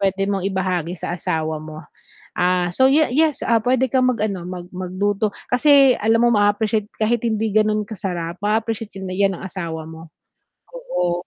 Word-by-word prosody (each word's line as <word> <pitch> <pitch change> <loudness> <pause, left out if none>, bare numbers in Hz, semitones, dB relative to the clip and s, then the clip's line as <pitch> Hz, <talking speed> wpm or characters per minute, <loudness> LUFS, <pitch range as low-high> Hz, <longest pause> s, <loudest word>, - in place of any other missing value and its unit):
puwede 195 0 0
mong 195 -2 -1
ibahagi 180 -2 -2
sa 175 +1 -4
asawa 160 -2 -2
mo. 155 0 -9 0.6
Ah, 180 -1 +1
so 260 +7 +4
ye 305 +3 +4
yes, 310 0 +1
ah, 230 -2 +3
puwede 260 +2 +2
kang 255 -1 +3
mag-ano, 210 -6 -2
mag 180 -1 -7
magluto 195 +3 -1 0.2
kasi 275 0 +6
alam 225 +2 +3
mo - - +5
maa-appreciate 205 +1 +1
kahit 220 +1 +1
hindi 220 -2 0
ganun 215 0 +2
kasarap, 180 -4 -5
maa-appreciate 220 0 -2
yun 185 -1 -5
'yan 195 -1 +1
ng - - -10
asawa 170 -4 -5
mo. 160 0 -11 0.6
Oo, 180 - -3
200 Hz, 165 wpm, -21 LUFS, 180-225 Hz, 0.6 s, kasi